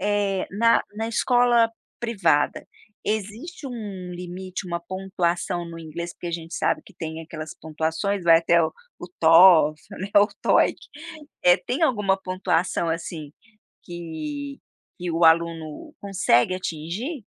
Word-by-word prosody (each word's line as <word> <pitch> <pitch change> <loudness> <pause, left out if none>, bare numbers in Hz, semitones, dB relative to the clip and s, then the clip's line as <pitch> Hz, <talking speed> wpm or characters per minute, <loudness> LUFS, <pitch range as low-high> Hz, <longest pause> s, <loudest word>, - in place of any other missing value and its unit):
eh, 200 -1 0
na 230 +3 +4
na 220 +1 -3
escola 240 -1 +3 0.3
privada, 200 -11 +1 0.4
existe 220 - -4
um 205 -7 -6
limite, 180 +1 -6
uma 170 -1 -3
pontuação 180 -1 -2
no 165 - -8
inglês 170 +2 -6
porque - - -8
a - - -3
gente 165 0 -6
sabe - - 0
que - - -17
tem 160 0 -6
aquelas 155 -1 -8
pontuações 160 +5 -2
vai 165 -1 +7
até 170 0 +3
o 160 - +1 0.3
o - - -6
TOEFL, 165 +1 +6
né, 195 - -4
o 205 +1 +7
TOEIC. - - +3 0.7
Eh, 180 +1 +7
tem 260 +7 -1
alguma 210 -9 +2
pontuação 185 -2 -1
assim 165 -2 -4 0.5
que 275 - -6 0.4
que 175 -1 -3
o 165 +1 +2
aluno 165 - +1
consegue 185 -7 +2
atingir? 185 - -5
180 Hz, 135 wpm, -24 LUFS, 165-205 Hz, 0.7 s, vai